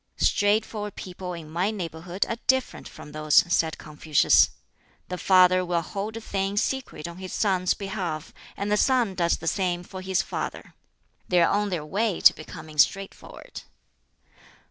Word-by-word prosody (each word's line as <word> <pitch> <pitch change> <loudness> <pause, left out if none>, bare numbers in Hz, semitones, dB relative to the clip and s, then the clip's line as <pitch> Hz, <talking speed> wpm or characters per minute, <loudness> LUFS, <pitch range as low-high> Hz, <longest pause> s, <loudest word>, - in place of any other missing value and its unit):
"Straightforward 210 0 +1
people 180 0 -7
in 165 -3 -8
my 175 +6 -1
neighborhood 175 -2 -3
are 230 - -3
different 260 0 0
from 150 - -12
those," 155 0 -1 0.2
said 160 -1 +1
Confucius. 150 0 +3 0.6
"The 180 - -3
father 185 -1 +5
will 175 -1 -1
hold 205 +6 -5
a - - -4
thing 195 -1 -2
secret 255 - -2
on 170 0 -9
his 185 -1 -7
son's 185 -3 +1
behalf, 190 -6 -5 0.2
and 200 +1 -2
the 210 - +3
son 245 -4 +2
does 170 -2 +1
the 165 - -10
same 175 0 0
for 185 +1 -9
his 190 -1 0
father. - - -5 0.6
They 180 - +4
are 170 - +4
on 205 0 +1
their 170 -5 -3
way 205 +4 -1
to - - +8
becoming 155 -1 -10
straightforward." 195 +5 -1
185 Hz, 160 wpm, -25 LUFS, 170-205 Hz, 0.6 s, to